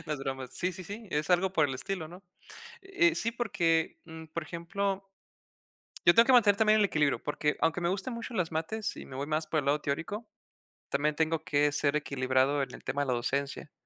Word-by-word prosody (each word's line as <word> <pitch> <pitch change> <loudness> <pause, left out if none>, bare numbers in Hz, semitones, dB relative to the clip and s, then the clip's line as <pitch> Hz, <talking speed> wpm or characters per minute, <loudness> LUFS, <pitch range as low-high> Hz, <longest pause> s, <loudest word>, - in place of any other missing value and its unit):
No, 155 - -2
es 145 - -3
broma. 135 -1 -4
Sí, 180 +1 -2
sí, 180 +1 -8
sí, 210 +4 -8
es 150 +4 -1
algo 180 +1 +3
por 155 -5 +3
el 135 - -3
estilo, 170 +2 -4
¿no? 180 +3 -12 0.6
Eh 345 -3 +2
sí, 230 - -1
porque, 170 -9 0
mm, 160 -1 -10
por 165 - -3
ejemplo 190 +5 -3 1.0
yo 170 - +7
tengo 230 - +7
que 260 - +4
mantener 210 -5 +6
también 215 0 +4
el 205 - +5
equilibrio, 150 -6 +1
porque 150 0 -1
aunque 165 +2 +2
me 170 - +1
gusten 200 +7 -2
mucho 235 +1 -6
las 175 -6 -1
mates, 165 +7 -2
y - - -8
me 130 - -10
voy 140 +2 -3
más 155 +1 0
por 155 - 0
el 140 - -4
lado 150 +2 +2
teórico, 165 +10 -3 0.6
también 150 +2 +1
tengo 160 0 +1
que 145 0 +2
ser 145 0 +1
equilibrado 135 -1 +1
en 125 -2 -4
el - - -14
tema 145 - -2
de 145 - -1
la 130 - +1
docencia. 140 +4 -2
160 Hz, 220 wpm, -30 LUFS, 145-200 Hz, 1.0 s, yo